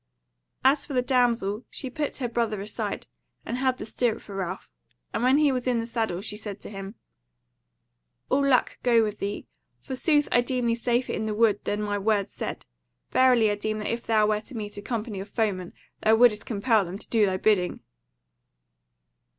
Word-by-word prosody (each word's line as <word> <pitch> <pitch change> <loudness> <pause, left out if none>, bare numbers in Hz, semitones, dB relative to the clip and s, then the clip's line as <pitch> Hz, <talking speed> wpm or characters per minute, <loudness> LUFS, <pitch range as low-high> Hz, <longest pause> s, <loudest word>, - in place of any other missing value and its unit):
As 275 +2 +5
for 290 - -7
the 250 -1 +2
damsel, 240 -4 +1
she 270 - -5
put 295 +1 -3
her 255 - -2
brother 230 -3 -1
aside, 205 +2 -4 0.4
and 235 - -3
held 260 -1 +1
the - - -6
stirrup 230 +1 0
for 200 - -11
Ralph; 190 -1 -4 0.5
and - - -1
when 255 +3 +4
he 295 -2 +4
was 255 -1 -2
in 245 -2 +2
the 230 - -2
saddle 225 -6 -2
she 210 0 -4
said 205 -2 -6
to - - -8
him: 195 +1 -7 1.3
"All 280 - +2
luck 270 -3 +2
go 235 -2 +4
with 210 -1 -3
thee! 200 +1 -3 0.3
Forsooth 290 - +1
I 245 - +5
deem 250 0 -1
thee 230 - +3
safer 240 +1 0
in 220 - -2
the 215 - -2
Wood 215 -2 +3
than 205 +1 -1
my 205 -1 -1
words 205 -1 0
said. - - -5 0.5
Verily 245 -4 +5
I - - 0
deem 215 +1 -2
that 215 +1 -2
if 235 - -6
thou 215 -2 +4
wert 210 0 0
to 250 - -8
meet 210 -1 -5
a 205 - -6
company 215 -2 -4
of 195 +2 -7
foemen, 195 -6 -1 0.3
thou 220 +1 +5
wouldest 220 -3 +4
compel 220 0 +2
them 180 +1 -6
to - - -11
do 220 -3 +3
thy 185 -1 0
bidding." 185 -3 +1
220 Hz, 200 wpm, -26 LUFS, 205-245 Hz, 1.3 s, As